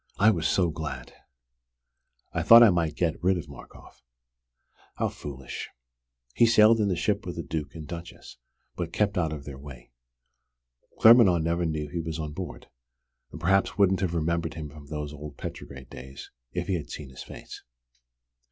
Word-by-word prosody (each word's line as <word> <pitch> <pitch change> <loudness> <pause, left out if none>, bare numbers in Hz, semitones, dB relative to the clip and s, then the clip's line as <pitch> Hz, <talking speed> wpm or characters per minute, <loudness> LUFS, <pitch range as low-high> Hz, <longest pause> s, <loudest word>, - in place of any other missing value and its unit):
I 110 +3 +6
was 85 -6 0
so 90 -3 +2
glad! 80 -1 -6 1.2
I - - 0
thought 115 +1 +9
I 110 - +7
might 85 -3 0
get 85 -2 -1
rid 95 0 +3
of 85 - -6
Markoff. 70 -2 -14 0.9
How - - 0
foolish! 65 -3 -7 0.6
He 115 - +5
sailed 115 0 +6
in 105 - +2
the 95 - +1
ship - - 0
with - - -6
the - - -4
Duke 75 -1 -5
and 80 -2 -8
Duchess, 85 -6 -9 0.4
but - - -4
kept 100 -1 +1
out 80 -3 0
of 75 -2 -7
their 70 -2 -8
way. 65 -4 -12 1.1
Claremanagh 110 -8 +7
never 85 +1 0
knew 75 -1 -3
he 80 +4 -4
was 80 -1 -4
on 75 -2 -5
board - - -7 0.6
and - - -9
perhaps 95 +3 +2
wouldn't 95 -2 +3
have 90 -3 -1
remembered 85 -1 -1
him 80 -2 -6
from 75 -1 -13
those 75 0 -5
old 75 0 -9
Petrograd 65 -1 -8
days 65 +1 -10 0.2
if 90 +3 -3
he 95 - -1
had 85 -5 -3
seen 70 -3 -8
his 65 - -10
face. - - -10
80 Hz, 175 wpm, -27 LUFS, 75-90 Hz, 1.2 s, thought